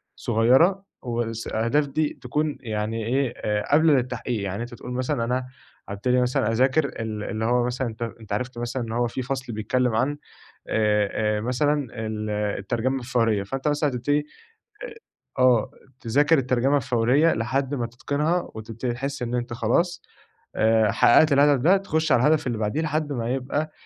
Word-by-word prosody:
صغيّرة 150 - +3 0.2
وس 115 -2 -3
الأهداف 115 +7 +1
دي 150 +2 -2
تكون 150 0 -1
يعني 110 -1 -3
إيه 130 +1 0 0.3
قابلة 155 +4 +4
للتحقيق. 125 -3 -1
يعني 100 +3 -3
أنت 120 0 -9
تقول 125 - -8
مثلًا 130 0 -1
أنا 125 +2 -1 0.4
هابتدي 125 +5 +1
مثلًا 125 -3 +1
أذاكر 130 +6 +2
ال 110 -5 -5
اللي 110 0 -3
هو 120 +1 +2
مثلًا 125 +1 -2 0.3
أنت 110 -2 -7
عرفت 125 +3 -3
مثلًا 120 +1 -3
إن 115 - -6
هو 120 +1 +1
في 125 +2 -4
فصل 130 -1 -4
بيتكلّم 110 +3 0
عن 135 +6 0 0.5
آآ، 105 0 +1
آآ، - - -3
مثلًا 140 +4 0 0.2
ال 110 -1 -4
الترجمة 105 +5 -1
الفورية، 115 -4 +1
فأنت 135 +9 -3
مثلًا 145 0 +1
هاتبتدي 130 +4 0 0.6
آآ، - - -7 0.4
آه، 125 -2 +4 0.3
تذاكر 145 +7 +3
الترجمة 130 +2 +2
الفورية 130 +4 +2
لحد 135 +5 -1
ما 120 -3 -2
تتقنها 145 +8 -2
وتبتدي 115 +3 -4
تحس 135 +2 -4
إن 120 0 -3
أنت 120 0 -2
خلاص 170 +10 0 0.5
آآ، 110 -1 +3
حققت 155 +5 +5
الهدف 140 -1 +4
ده، 180 +8 +5
تخش 160 -6 0
على - - +4
الهدف 155 -2 +2
اللي 120 -3 -1
بعديه 110 +8 -1
لحد 155 -1 -1
ما 115 -2 -2
يبقى 145 +4 -2
125 Hz, 160 wpm, -24 LUFS, 115-140 Hz, 0.6 s, حققت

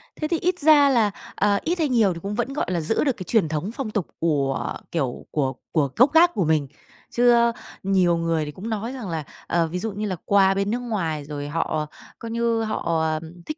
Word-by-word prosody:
Thế 305 - -3
thì 335 -1 0
ít 360 +1 0
ra 290 -2 +6
là, 225 -5 +3 0.2
ờ, 205 -1 +2
ít 345 +2 -1
hay 305 -3 +1
nhiều 220 -7 +3
thì 170 - -8
cũng 205 +1 -3
vẫn, 245 +3 -2
gọi 300 - -1
là, 175 - 0
giữ 200 - 0
được 275 -5 0
cái 185 - -5
truyền 180 -3 +1
thống 155 +7 -2
phong 245 -6 -4
tục 205 -6 -2
của, 140 -5 0 0.2
kiểu, 135 -7 -2
của 135 -3 0 0.2
của 145 -5 +1
gốc 265 +6 +4
gác 345 +2 +6
của 185 - 0
mình. 155 -3 +1 0.4
Chứ 245 0 +4
á, 235 0 +4 0.3
nhiều 185 -3 +3
người 165 -2 0
thì 150 - -6
cũng 205 +8 -7
nói 225 +4 -3
rằng 230 -8 -6
là, 160 -2 -3 0.2
ờ, 170 -1 +1
ví 180 +3 -4
dụ 225 +1 -3
như 210 +2 -4
là 185 - -2
qua 195 -1 +4
bên 200 +2 -1
nước 245 - -1
ngoài 175 -11 -2
rồi 145 -1 -5
họ 155 0 -1 0.3
coi 230 0 -6
như 230 -1 0
họ, 170 -7 -1
à, 155 -1 0 0.3
thích 305 - -5
200 Hz, 240 wpm, -23 LUFS, 160-235 Hz, 0.4 s, ra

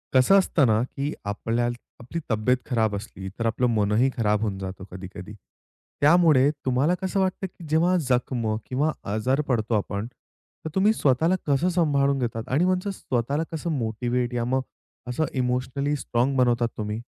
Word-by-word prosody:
कसं 130 +10 +6
असतं 165 -6 +2
ना, 110 0 +3
की 140 +3 -4
आपल्याला 115 +4 -1 0.3
आपली 125 +8 -5
तब्येत 110 +4 +2
खराब 110 -5 +1
असली, 100 -2 -7
तर 115 - -1
आपलं 115 +2 +1
मनही 105 +5 +3
खराब 105 -2 +1
होऊन 105 -3 -1
जातं 95 0 -6
कधी-कधी. 95 +1 -9 0.7
त्यामुळे 150 -3 +5 0.2
तुम्हाला 130 +6 +2
कसं 190 +1 -1
वाटतं, 190 0 0
की 175 - -16
जेव्हा 170 +4 +3
जखम 125 -2 0 0.2
किंवा 145 +5 +1 0.2
आजारी 130 +7 +1
पडतो 115 -3 0
आपण, 100 +1 -3 0.6
तर - - -2
तुम्ही 200 +3 +4
स्वतःला 160 - +2
कसं 145 +5 +2
सांभाळून 140 -6 +2
घेतात? 115 -2 -2
आणि 145 +8 +2
म्हणतात 185 +2 0
स्वतःला 140 -3 -1
कसं 165 +1 -3
मोटिव्हेट 120 +2 -1
या 120 -1 -1
मग 130 +2 +1 0.5
असं 125 +6 0
इमोशनली 130 +3 -1
स्ट्राँग 130 0 0
बनवता 120 -2 +3
तुम्ही? 105 +1 -3
125 Hz, 155 wpm, -25 LUFS, 115-150 Hz, 0.7 s, कसं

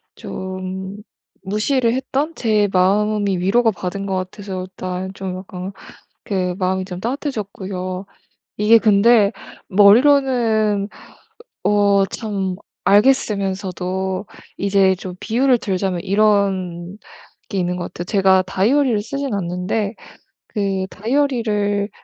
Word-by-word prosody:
좀 190 +1 -6 0.5
무시를 230 +5 +1
했던 275 +4 -1
제 215 -3 +2
마음이 200 +1 +2
위로가 225 +6 +3
받은 195 0 -5
것 195 -1 -2
같아서 185 0 -5
일단 185 0 -5
좀 190 -1 -5
약간 185 0 -7 0.5
그 185 -3 -1
마음이 190 0 0
좀 180 -1 -7
따뜻해졌고요. 195 -7 -4 0.5
이게 210 +2 +6
근데 215 0 +4 0.4
머리로는 220 -1 +4
으 210 - -15 0.6
어 200 -1 +4
참 195 -3 -3 0.3
알겠으면서도 190 -4 +1 0.3
이제 195 -1 +3
좀 180 0 -8
비유를 250 +4 +2
들자면 190 -3 -2
이런 195 -3 +1 0.5
게 200 - -3
있는 180 0 -1
것 175 - -5
같아요. 175 - -5
제가 190 0 +3
다이어리를 220 +5 +1
쓰진 275 +2 -3
않는데 190 +3 -2 0.5
그 195 -3 -1
다이어리를 215 -4 0
200 Hz, 240 characters per minute, -20 LUFS, 185-215 Hz, 0.6 s, 이게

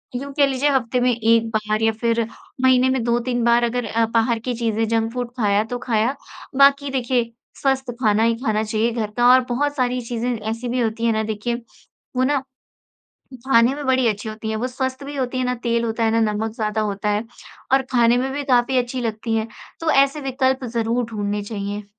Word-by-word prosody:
यूँ 275 +3 -4
कह 285 0 +4
लीजिए, 275 +2 +1
हफ़्ते 255 -3 +1
में 250 0 +3
1 230 0 +2
बार 215 0 0
या 225 - +4
फिर 230 +1 0 0.4
महीने 260 0 +4
में 260 -2 0
2-3 240 +1 0
बार 235 0 +4
अगर 240 0 -1
अ, 225 +1 +1
बाहर 230 0 +2
की 245 +2 -3
चीज़ें, 225 -1 -1
जंक 225 0 0
फ़ूड 245 -1 -4
खाया 205 -2 +2
तो - - -1
खाया 230 +3 +1 0.4
बाकी 280 0 +5
देखिए, 245 -2 0 0.3
स्वस्थ 265 -2 0
खाना 215 0 +3
ही 230 0 +3
खाना 215 -1 +1
चाहिए 220 +2 0
घर 220 -3 -3
का 240 0 +4
और 255 - +6
बहुत 285 +4 0
सारी 250 -2 0
चीज़ें 240 +1 -3
ऐसी 225 +3 -4
भी 250 +1 -1
होती 230 0 -1
हैं 230 - +3
ना, 220 0 0
देखिए, 220 +3 -3 0.5
वो 255 - +2
ना 275 0 +1 1.0
खाने 245 -1 +4
में 290 0 -6
बड़ी 260 -1 +2
अच्छी 210 0 -2
होती 220 0 -6
हैं। 220 - -2
वो 245 +3 -2
स्वस्थ 260 +1 -4
भी 285 +1 -7
होती 255 -1 -2
हैं, 255 - 0
ना 250 - 0
तेल 235 -1 +1
होता 230 0 -1
है, 225 - +2
ना 230 - +2
नमक 220 +1 -2
ज़्यादा 215 -1 -1
होता 205 0 -2
है 210 +1 0 0.5
और 270 - +5
खाने 240 -1 +4
में 265 +2 -1
भी 285 +1 -3
काफ़ी 255 -1 +2
अच्छी 250 +1 -1
लगती 225 0 -3
हैं, 220 0 -1 0.3
तो 330 - -1
ऐसे 275 +2 +3
विकल्प 265 -1 0
ज़रूर 235 +1 -1
ढूँढने 205 -1 -2
चाहिए। 205 0 -5
235 Hz, 215 wpm, -21 LUFS, 225-260 Hz, 1.0 s, और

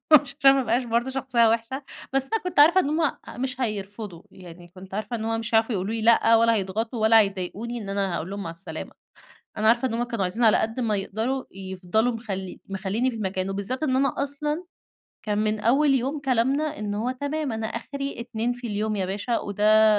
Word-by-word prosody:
عشان 275 -2 +6
ما 270 - +2
أبقاش 245 +1 +1
برضه 235 +2 0
شخصية 260 -3 +2
وحشة 230 +5 -1 0.3
بس 270 0 +2
أنا 450 - +1
كنت 360 -3 -4
عارفة 340 +6 +7
إن 285 - -1
هُم 315 -1 +1 0.3
مش 260 0 -3
هيرفضوا، 205 -5 -4
يعني 175 -1 -13
كنت 185 +2 -12
عارفة 215 +3 -3
إن 220 - -5
هو 225 0 0
مش 225 +1 -4
هيعرفوا 225 +2 +4
يقولوا 195 +3 -2
لي 225 - -3
لأ 230 0 +5
ولا 230 0 +4
هيضغطوا 220 +4 -2
ولا 220 +1 +7
هيضايقوني 200 +4 -2
إن 200 - -8
أنا 195 -2 -1
هاقول 170 +3 -4
لهم 200 0 -4
مع 165 - -4
السلامة، 170 +3 -6 0.7
أنا 215 0 +2
عارفة 235 +3 +4
إن 235 - -5
هُم 235 +1 0
كانوا 235 -4 -2
عايزين 205 +7 -1
على 220 -2 +6
قد 225 +3 -2
ما 225 -4 +1
يقدروا 225 +7 -2
يفضلوا 190 +4 -1
مخل 195 -5 -5
مخلّيينني 200 +6 -1
في 245 - -6
المكان. 190 -3 -2
وبالذات 200 +8 -3
إن 260 -4 +1
أنا 275 +1 +2
أصلًا 295 +4 -2 0.6
كان 210 -1 0
من 215 0 0
أول 275 +6 +3
يوم 270 +4 -1
كلامنا 275 +4 +1
إن 210 -1 -3
هو 230 +4 -1
تمام، 285 +2 -3
أنا 220 0 -3
آخري 275 +4 -5
2 235 0 -2
في 245 0 -7
اليوم 215 0 -1
يا 195 -2 -1
باشا 205 +5 -1
وده 210 +2 +4
225 Hz, 205 wpm, -25 LUFS, 205-260 Hz, 0.7 s, عارفة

